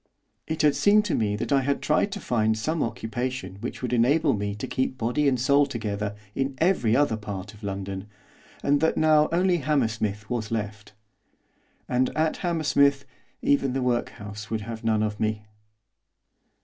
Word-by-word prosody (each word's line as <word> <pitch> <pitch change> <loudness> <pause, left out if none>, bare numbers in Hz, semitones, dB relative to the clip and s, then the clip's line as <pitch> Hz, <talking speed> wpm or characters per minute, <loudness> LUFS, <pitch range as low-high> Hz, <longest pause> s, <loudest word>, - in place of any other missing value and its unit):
It 160 0 -1
had 145 -2 +4
seemed 210 +1 +4
to 190 - -1
me 105 -2 +1
that 105 - -4
I 140 -1 +4
had 140 +1 0
tried 155 +6 +1
to 205 - -4
find 110 - +1
some 155 +9 -1
occupation 115 -3 -3
which 125 - -6
would 125 -1 -1
enable 140 +6 +3
me 100 -1 -2
to 105 - -5
keep 130 0 -2
body 125 +5 +1
and 130 -3 +2
soul 140 +3 +4
together 105 -4 -3 0.2
in 135 +2 -2
every 145 - +2
other 135 -5 +2
part 105 -1 -6
of 105 - -16
London, 100 -1 -5 0.6
and 145 0 +2
that 160 - +2
now 155 -1 +4
only 180 +1 +3
Hammersmith 110 -8 -1
was 115 -2 -3
left. 105 -1 -4 0.9
And, 125 +1 +1
at 160 0 +1
Hammersmith, 140 -5 +2 0.4
even 140 -2 +2
the 135 -1 -1
workhouse 105 -4 -3
would 110 -1 -2
have 115 +1 -7
none 110 -1 +2
of 105 -1 -2
me! 110 -1 -1
120 Hz, 170 wpm, -26 LUFS, 105-145 Hz, 0.9 s, had